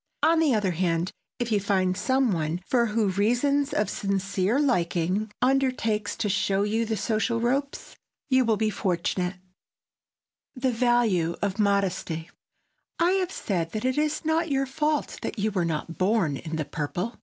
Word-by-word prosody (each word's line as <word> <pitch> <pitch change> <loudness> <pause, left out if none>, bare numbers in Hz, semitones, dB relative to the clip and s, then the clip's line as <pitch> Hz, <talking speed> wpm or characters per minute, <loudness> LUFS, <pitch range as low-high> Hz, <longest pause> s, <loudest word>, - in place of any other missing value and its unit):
On 330 0 +5
the 300 -7 +3
other 205 -3 +1
hand, 170 0 0 0.3
if 240 -2 -3
you 210 - +3
find 190 -2 +1
some 260 +4 +1
one 160 -2 -1
who 240 -2 +3
for 215 0 +1
reasons 245 +9 +1
of 210 - +1
sincere 195 +2 0
liking 190 - 0
undertakes 255 -5 +1
to 210 - -1
show 195 0 +1
you 220 +2 0
the 220 -1 -1
social 220 +3 0
ropes, 275 +4 -2 0.3
you 260 -2 +4
will 225 -3 +2
be 215 0 +1
fortunate. 180 -1 -1
[Sidenote: - - -25 1.2
THE 260 0 0
VALUE 225 -8 +2
OF 200 0 -1
MODESTY] 190 -5 0 0.7
I 340 +2 +3
have 380 -1 0
said 170 - -2
that 215 +2 -3
it 260 +3 +1
is 305 +1 -1
not 320 +1 +1
your 275 -1 +1
fault 300 +2 -1
that - - -4
you 215 +1 0
were 185 -4 0
not 165 +1 -4
born 185 -6 +2
in 160 +3 -5
the 155 -2 -2
purple. 175 - -3
210 Hz, 165 wpm, -26 LUFS, 185-255 Hz, 1.2 s, On